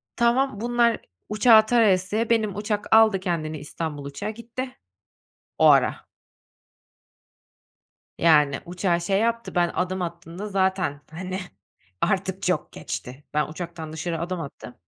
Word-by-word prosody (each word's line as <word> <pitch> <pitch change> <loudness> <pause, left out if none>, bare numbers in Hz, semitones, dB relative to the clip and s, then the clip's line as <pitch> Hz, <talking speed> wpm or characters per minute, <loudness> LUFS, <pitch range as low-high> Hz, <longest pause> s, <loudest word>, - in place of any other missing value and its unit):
Tamam, 235 -2 +2
bunlar 235 -1 +2 0.3
uçağı 220 +1 +6
tarayasıya 215 -1 +2
benim 215 -4 +1
uçak 210 +1 0
aldı 220 -4 +6
kendini 160 -4 -2
İstanbul 150 -1 -5
uçağı 145 +9 -5
gitti 235 +3 -7 0.8
o - - +4
ara. - - +5 2.2
Yani 150 -4 +4
uçağı 175 0 0
şey 195 +4 +1
yaptı, 230 0 -1
ben 175 -1 +3
adım 185 +1 -1
attığımda 170 +3 -6
zaten, 190 -6 0
hani, 185 +3 -5 0.6
artık - - 0
çok - - -1
geçti. 130 +4 -7
Ben 150 0 +1
uçaktan 165 -1 -7
dışarı 165 +1 -3
adım 175 +1 -3
attım 140 -4 -9
185 Hz, 120 wpm, -24 LUFS, 165-220 Hz, 2.2 s, uçağı